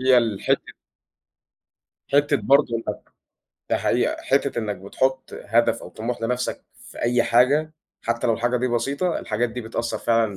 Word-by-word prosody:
هي 130 Hz, -1 st, +6 dB
الحتّة 110 Hz, -4 st, 0 dB, 1.4 s
حتّة 145 Hz, 0 st, +4 dB
برضه 140 Hz, +2 st, +4 dB
إنك 115 Hz, -, -5 dB, 0.7 s
ده -, -, +3 dB
حقيقة، -, -, +1 dB
حتّة -, -, +1 dB
إنك 105 Hz, -3 st, -2 dB
بتحط 130 Hz, +8 st, -2 dB
هدف 115 Hz, +3 st, +2 dB
أو -, -, -8 dB
طموح 115 Hz, +1 st, -5 dB
لنفْسك 125 Hz, +2 st, -2 dB
في -, -, -14 dB
أي 120 Hz, 0 st, +3 dB
حاجة 140 Hz, +6 st, +3 dB, 0.3 s
حتّى 115 Hz, +1 st, -1 dB
لو 115 Hz, -, +3 dB
الحاجة 120 Hz, +2 st, 0 dB
دي 125 Hz, +1 st, 0 dB
بسيطة، 140 Hz, +9 st, 0 dB
الحاجات 115 Hz, +3 st, -1 dB
دي 125 Hz, +2 st, -5 dB
بتأثّر 115 Hz, +1 st, -3 dB
فعلًا 115 Hz, -4 st, +1 dB
120 Hz, 150 wpm, -23 LUFS, 115-130 Hz, 1.4 s, هي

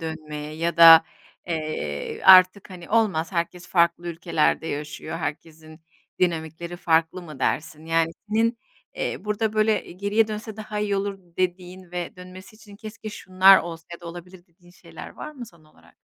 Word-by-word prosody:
dönmeye? 155 Hz, -2 st, -6 dB
Ya 165 Hz, +2 st, -2 dB
da, 165 Hz, -1 st, +10 dB, 0.4 s
eee, 155 Hz, -, -4 dB
artık 185 Hz, +1 st, +6 dB
hani 175 Hz, -2 st, -11 dB
olmaz, 200 Hz, -7 st, +1 dB
herkes 175 Hz, 0 st, -3 dB
farklı 170 Hz, 0 st, +1 dB
ülkelerde 165 Hz, -1 st, 0 dB
yaşıyor, 150 Hz, +2 st, -5 dB
herkesin 155 Hz, 0 st, -7 dB, 0.4 s
dinamikleri 170 Hz, 0 st, -2 dB
farklı 165 Hz, +1 st, +1 dB
mı 155 Hz, -5 st, -11 dB
dersin? 155 Hz, 0 st, -2 dB
Yani, 165 Hz, 0 st, +1 dB, 0.2 s
senin, 230 Hz, +2 st, +1 dB, 0.4 s
eee, -, -, -4 dB
burada, 210 Hz, +1 st, -1 dB
böyle, 215 Hz, -2 st, 0 dB
geriye 205 Hz, +4 st, 0 dB
dönse 215 Hz, 0 st, -6 dB
daha 215 Hz, -1 st, -6 dB
iyi 205 Hz, -1 st, -1 dB
olur 195 Hz, 0 st, -3 dB, 0.2 s
dediğin 185 Hz, 0 st, -4 dB
ve 175 Hz, 0 st, -5 dB
dönmesi 185 Hz, +3 st, -13 dB
için 205 Hz, -2 st, -15 dB
keşke 215 Hz, +1 st, -9 dB
şunlar 190 Hz, -1 st, +5 dB
olsa 165 Hz, -1 st, -7 dB
ya 170 Hz, -, -9 dB
da 170 Hz, -, -11 dB
olabilir 175 Hz, +1 st, -11 dB
dediğin 175 Hz, +1 st, -23 dB
şeyler 180 Hz, -, -12 dB
var -, -, -9 dB
mı 260 Hz, -5 st, -10 dB
son 170 Hz, -6 st, -20 dB
olarak? 155 Hz, -, -24 dB
175 Hz, 155 wpm, -24 LUFS, 165-200 Hz, 0.4 s, da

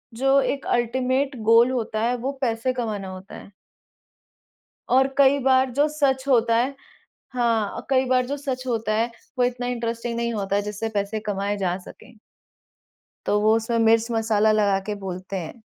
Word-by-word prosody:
जो 270 Hz, +3 st, +3 dB
एक 275 Hz, 0 st, -2 dB
ultimate 260 Hz, +3 st, 0 dB
goal 230 Hz, +2 st, +6 dB
होता 220 Hz, -3 st, -2 dB
है, 240 Hz, +2 st, +1 dB
वो 255 Hz, +3 st, -3 dB
पैसे 235 Hz, 0 st, 0 dB
कमाना 215 Hz, -6 st, -3 dB
होता 185 Hz, +1 st, -10 dB
है। -, -, -12 dB, 1.4 s
और 265 Hz, +2 st, +4 dB
कई 280 Hz, 0 st, +5 dB
बार 260 Hz, 0 st, +4 dB
जो 285 Hz, +4 st, +2 dB
सच 275 Hz, -3 st, 0 dB
होता 230 Hz, -3 st, +3 dB
है 255 Hz, +4 st, 0 dB, 0.6 s
हाँ, 230 Hz, -4 st, 0 dB
कई 265 Hz, -1 st, +3 dB
बार 255 Hz, 0 st, +2 dB
जो 280 Hz, +3 st, -3 dB
सच 265 Hz, -2 st, -4 dB
होता 225 Hz, -3 st, -1 dB
है, 230 Hz, +2 st, 0 dB, 0.3 s
वो -, -, +4 dB
इतना 245 Hz, 0 st, -3 dB
इंटरेस्टिंग 235 Hz, -1 st, -3 dB
नहीं 235 Hz, 0 st, -1 dB
होता 200 Hz, -2 st, -2 dB
है, 205 Hz, -, +2 dB
जिससे 210 Hz, +2 st, -4 dB
पैसे 200 Hz, +2 st, -1 dB
कमाएँ 200 Hz, +1 st, -1 dB
जा 185 Hz, -2 st, -1 dB
सके 245 Hz, -, -14 dB, 1.1 s
तो 205 Hz, -, +2 dB
वो 215 Hz, +1 st, +4 dB
उसमें 225 Hz, +1 st, -1 dB
मिर्च-मसाला 225 Hz, -1 st, +3 dB
लगा 205 Hz, -2 st, +2 dB
के 210 Hz, -, -1 dB
बोलते 185 Hz, +1 st, -5 dB
हैं। 180 Hz, +7 st, -8 dB
235 Hz, 170 wpm, -23 LUFS, 215-255 Hz, 1.4 s, goal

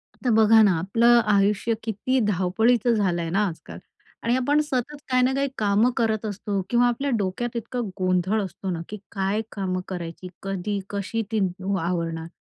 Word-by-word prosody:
आता 250 Hz, -, -2 dB
बघा 220 Hz, 0 st, +6 dB
ना, 205 Hz, -, +5 dB
आपलं 230 Hz, +7 st, +4 dB
आयुष्य 205 Hz, +2 st, +2 dB
किती 230 Hz, +4 st, 0 dB
धावपळीचं 220 Hz, +5 st, +2 dB
झालं 190 Hz, -6 st, +1 dB
आहे 165 Hz, -, -3 dB
ना 195 Hz, +5 st, +1 dB
आजकाल 165 Hz, -3 st, -8 dB, 0.4 s
आणि 235 Hz, +1 st, +2 dB
आपण 285 Hz, +4 st, +2 dB
सतत 295 Hz, -1 st, -2 dB
काही 255 Hz, -1 st, +3 dB
ना 260 Hz, +1 st, +2 dB
काही 275 Hz, 0 st, +1 dB
कामं 210 Hz, +3 st, +3 dB
करत 220 Hz, -2 st, 0 dB
असतो 205 Hz, -1 st, -3 dB
किंवा 245 Hz, 0 st, +4 dB
आपल्या 260 Hz, +4 st, -1 dB
डोक्यात 220 Hz, +5 st, -3 dB
इतका 240 Hz, +2 st, -4 dB, 0.2 s
गोंधळ 185 Hz, +3 st, +1 dB
असतो 190 Hz, 0 st, -6 dB
ना 165 Hz, -2 st, -3 dB
की 210 Hz, -, -6 dB
काय 195 Hz, +2 st, -1 dB
कामं 185 Hz, -2 st, -2 dB
करायची? 175 Hz, -1 st, -6 dB, 0.2 s
कधी, 195 Hz, +1 st, -2 dB
कशी 205 Hz, +3 st, -2 dB
ती 220 Hz, -, +1 dB, 0.4 s
आवरणार? 165 Hz, -1 st, -2 dB
210 Hz, 170 wpm, -24 LUFS, 185-235 Hz, 0.4 s, बघा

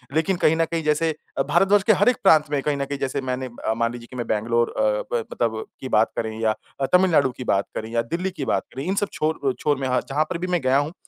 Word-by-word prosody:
लेकिन 165 Hz, +4 st, +2 dB
कहीं 160 Hz, -, +5 dB
न 165 Hz, 0 st, +2 dB
कहीं 165 Hz, 0 st, -3 dB
जैसे 150 Hz, +2 st, +1 dB, 0.3 s
अ, -, -, +3 dB
भारतवर्ष 195 Hz, +1 st, +4 dB
के -, -, +9 dB
हर 205 Hz, -, +4 dB
एक 250 Hz, -, +1 dB
प्रांत 155 Hz, -6 st, +5 dB
में 145 Hz, -2 st, +1 dB
कहीं 145 Hz, 0 st, -1 dB
न 140 Hz, -, -1 dB
कहीं 140 Hz, 0 st, -5 dB
जैसे 135 Hz, +1 st, -2 dB
मैंने 130 Hz, 0 st, -3 dB, 0.2 s
अ, 110 Hz, -, +2 dB
मान 115 Hz, +1 st, 0 dB
लीजिए 120 Hz, -1 st, -9 dB
कि -, -, -9 dB
मैं 120 Hz, -1 st, -4 dB
बैंगलोर 115 Hz, +2 st, +1 dB
अ, -, -, +2 dB, 0.3 s
ब 120 Hz, -1 st, +1 dB
मतलब 110 Hz, -2 st, -1 dB, 0.2 s
की 130 Hz, -, -6 dB
बात 110 Hz, -, +3 dB
करें 110 Hz, -1 st, -3 dB
या 110 Hz, -1 st, +1 dB, 0.2 s
अ, 135 Hz, -, +1 dB
तमिलनाडु 170 Hz, -8 st, +4 dB
की -, -, -5 dB
बात 100 Hz, 0 st, +1 dB
करें 110 Hz, -, -4 dB
या 115 Hz, 0 st, +1 dB
दिल्ली 185 Hz, +3 st, -1 dB
की 135 Hz, -, -1 dB
बात -, -, 0 dB
करें, 135 Hz, -, -5 dB
इन 190 Hz, +2 st, 0 dB
सब 205 Hz, -, -2 dB
छोर 155 Hz, +1 st, -1 dB
अ, -, -, +2 dB
छोर 145 Hz, -2 st, +1 dB
में 135 Hz, -1 st, -2 dB
हाँ, 125 Hz, 0 st, +1 dB
जहाँ 145 Hz, +3 st, +2 dB
पर 180 Hz, -, -2 dB
भी 180 Hz, +2 st, -4 dB
मैं 175 Hz, -, 0 dB
गया 130 Hz, +1 st, +3 dB
हूँ, 145 Hz, +3 st, -1 dB
140 Hz, 285 wpm, -23 LUFS, 120-165 Hz, 0.3 s, के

